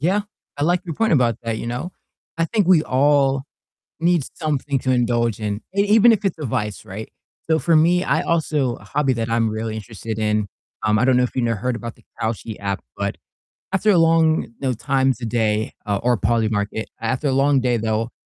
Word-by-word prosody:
Yeah, 190 +7 +1 0.3
I 145 - -3
like 175 +2 +2
your 165 -3 -5
point 225 -5 +1
about 120 -6 +3
that, 115 -1 -2
you - - -5
know? 125 +10 -4 0.5
I 165 - +3
think 205 0 0
we 175 -4 +5
all 135 0 +2 0.6
need 170 -1 +3
something 145 -3 -1
to 130 - -1
indulge 120 -3 +1
in, 105 0 -2 0.2
e 200 - +4
even 220 +3 +6
if 215 -1 -1
it's 175 -4 -1
a 150 - -4
vice, 105 -4 -3
right? 105 +3 -8 0.4
So 160 - +4
for 165 -1 +3
me, 175 +3 +3
I - - +1
also 150 -6 0
a - - -16
hobby 140 -3 0
that 115 -1 -2
I'm 115 -1 +2
really 110 0 -3
interested 110 0 -6
in, 105 -1 +1 0.4
um, 105 0 +3
I 125 - +2
don't 130 -1 +4
know 125 - +4
if - - -4
you 130 - 0
know, 115 -1 +1
heard 120 +4 -2
about 115 -1 -7
the - - -24 0.2
Kalshi 110 -1 -3
app, 100 -1 -2 0.2
but 100 0 -2 0.6
after 205 +2 +2
a 180 - +5
long, 165 -1 +4
you - - -12
know, 130 -2 0
times 130 +1 0
a - - -4
day, 110 -1 0
uh, 100 -1 0
or 120 -1 +3
Polymarket, 110 -1 0 0.2
after 130 +5 -1
a - - +1
long 135 +1 +3
day 125 -2 +1
though, 110 +1 -1
125 Hz, 215 wpm, -21 LUFS, 110-155 Hz, 0.6 s, even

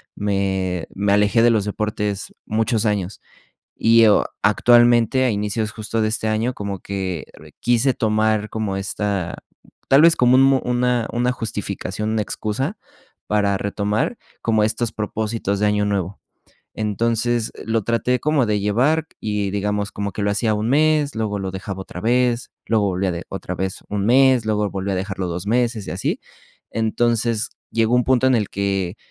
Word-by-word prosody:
me 95 -3 -1
me 100 +1 0
alejé 105 +2 +3
de 120 - +5
los 110 -3 +2
deportes 105 -1 -3
muchos 110 +1 0
años, 100 -3 -1 0.6
y 115 0 +5
o 105 - +4 0.2
actualmente, 120 +3 +4
a 125 - +2
inicios 105 +1 -2
justo 110 +1 -2
de 110 - +1
este 110 0 -1
año, 110 +3 0
como 100 -4 -5
que 95 -5 -4
re - - -16
quise 120 +2 +2
tomar 110 -1 +1
como 105 -3 -2
esta, 100 -3 -2 0.5
tal 135 +2 +6
vez 165 0 +6
como 125 +1 +4
un 135 0 +5
una 125 -1 +1
una 125 +1 +1
justificación, 110 -2 -4
una 110 -1 0
excusa 125 - -3 0.5
para 100 -2 +2
retomar, 105 - -1 0.2
como 110 -2 +2
estos 110 +1 -1
propósitos 105 -1 -2
de 105 - +3
año 105 0 +2
nuevo, 100 -2 -2 0.5
entonces, 115 +2 0
lo 115 -1 0
traté 115 +3 0
como 150 -3 +2
de 105 -1 0
llevar 130 +11 +1
y, 105 -2 -1
digamos, 105 +1 -1
como 100 0 -4
que - - -4
lo 100 - +1
hacía 110 +1 +1
un 105 +2 -1
mes, 150 0 +2
luego 105 -2 -2
lo 95 -1 -4
dejaba 95 0 -6
otra 90 -1 -8
vez, 120 +1 +1
luego 110 -2 +2
volvía 95 0 0
de 85 0 -5
otra - - -5
vez 95 +1 -3
un 100 -1 -1
mes, 130 0 +4
luego 105 -1 0
volvió 95 0 -3
a - - -1
dejarlo 95 0 -3
2 90 +3 -5
meses 115 -2 0
y - - -4
así, - - -2 0.5
entonces, 115 0 0 0.2
llegó 115 +1 +2
un 125 - +3
punto 130 0 +3
en 130 - +4
el 105 -4 0
que 100 -1 -2
110 Hz, 170 wpm, -21 LUFS, 100-120 Hz, 0.6 s, tal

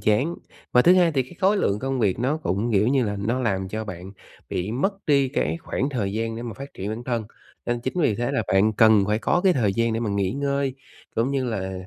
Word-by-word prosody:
chán. 110 +11 +1 0.4
Và 125 - +6
thứ 180 - +6
hai 175 -3 +4
thì 135 - +2
cái 130 +8 -14
khối 195 +2 +4
lượng 100 - +1
công 135 +2 -2
việc 100 -3 +1
nó 135 +6 0
cũng, 115 - -1
kiểu 105 +3 +3
như 130 -2 +2
là, 105 -1 -2
nó 115 +6 -1
làm 95 -5 -1
cho 110 +2 -4
bạn 95 0 -8 0.4
bị 95 +4 -3
mất 190 - 0
đi 140 -3 +3
cái 145 - -1
khoảng 135 - -2
thời 105 -8 -2
gian 115 +1 -2
để 115 - -5
mà 115 -2 -5
phát 140 +3 -10
triển 95 +2 -5
bản 115 +2 -5
thân. 120 -3 -1 0.4
Nên 120 0 -1
chính 130 - -4
vì 130 -10 +2
thế 120 +2 -2
là 110 - +1
bạn 100 +3 +3
cần 110 -2 +5
phải 105 +1 +1
có 175 - +1
cái 185 - +6
thời 110 - +1
gian 115 +2 +1
để 115 - -1
mà 110 -3 -1
nghỉ 100 -1 0
ngơi 140 -1 -1 0.4
cũng 115 +4 +1
như 135 -2 0
là, 100 -6 -3
115 Hz, 260 wpm, -24 LUFS, 105-135 Hz, 0.4 s, Và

